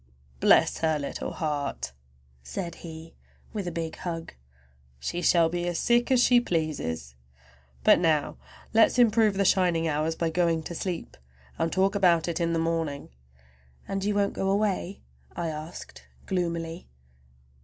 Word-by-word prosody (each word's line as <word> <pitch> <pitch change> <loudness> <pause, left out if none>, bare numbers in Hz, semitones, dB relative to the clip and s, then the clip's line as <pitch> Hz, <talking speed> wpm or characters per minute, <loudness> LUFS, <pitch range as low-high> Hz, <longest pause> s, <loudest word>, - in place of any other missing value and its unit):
"Bless - - +4
her 160 -1 +1
little 140 -1 -4
heart!" 150 - -3 0.5
said 65 - -5
he 160 -1 -9 0.4
with 205 -4 -3
a - - -2
big 165 -1 -4
hug; 165 -2 -5 0.7
"she 175 - -3
shall 170 -2 +4
be 175 +1 -2
as 175 -1 -1
sick 240 +5 +2
as 260 -2 +4
she 245 -1 +5
pleases! 150 - -2 0.7
But - - +6
now 160 -4 +1 0.4
let's 225 +2 +5
improve 225 -3 +4
the 200 0 +1
shining 175 -4 +3
hours 155 +1 0
by 165 -1 -1
going 165 -1 +1
to 170 - -6
sleep, 175 0 -4 0.4
and 165 0 0
talk 190 +1 +2
about 175 -5 +3
it 170 -1 -2
in 170 -1 +1
the 165 - +1
morning!" 165 -3 -2 0.8
"And 195 0 -2
you 205 0 0
won't 200 -1 +1
go 195 - -1
away?" 200 -1 -1 0.3
I 170 -1 -2
asked 150 - -8 0.2
gloomily. 170 -2 -3
170 Hz, 150 wpm, -27 LUFS, 160-190 Hz, 0.8 s, But